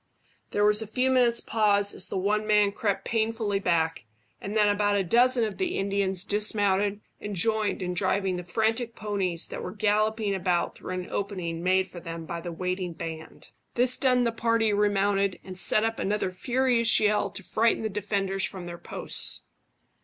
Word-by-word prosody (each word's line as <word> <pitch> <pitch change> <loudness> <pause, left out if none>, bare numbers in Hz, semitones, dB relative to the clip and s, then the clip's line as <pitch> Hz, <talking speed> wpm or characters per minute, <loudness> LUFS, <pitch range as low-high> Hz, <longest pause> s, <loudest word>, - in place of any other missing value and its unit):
There 205 - +1
was 210 +1 +4
a 220 - -5
few 255 +5 +1
moments' 245 -2 +3
pause 205 -2 +2
as 185 - +2
the - - -4
one 210 +3 0
man 210 -1 +4
crept 200 -1 -2
painfully 220 -2 -1
back, 165 - 0 0.4
and 205 +3 -3
then 210 -1 +4
about 205 0 +2
a 200 - +1
dozen 240 +6 +3
of 215 -3 -3
the 370 -2 -1
Indians 195 -1 0
dismounted 205 -1 +1 0.2
and 205 -1 -5
joined 215 +1 0
in 180 0 -2
driving 190 +1 0
the 180 - -4
frantic 225 +5 -1
ponies 190 -5 -2
that - - -6
were - - -5
galloping 215 +1 0
about 180 -2 0
through 185 - -7
an 180 0 -5
opening 180 -5 -3
made 185 +1 +2
for 180 -2 -10
them 165 -1 -7
by 170 0 -5
the 175 0 -6
waiting 180 +1 -3
band. 160 0 -8 0.2
This 250 +1 +4
done 250 -2 +3
the 235 - +1
party 230 -1 +1
remounted, 200 -1 +1
and 185 - -9
set 210 +4 +3
up 225 0 -1
another 200 -1 -1
furious 240 +3 +2
yell 210 -1 +2
to 195 - -8
frighten 225 +3 +1
the - - 0
defenders 195 -1 -2
from 185 -3 -4
their 175 0 -8
posts. - - 0
205 Hz, 185 wpm, -27 LUFS, 185-220 Hz, 0.4 s, was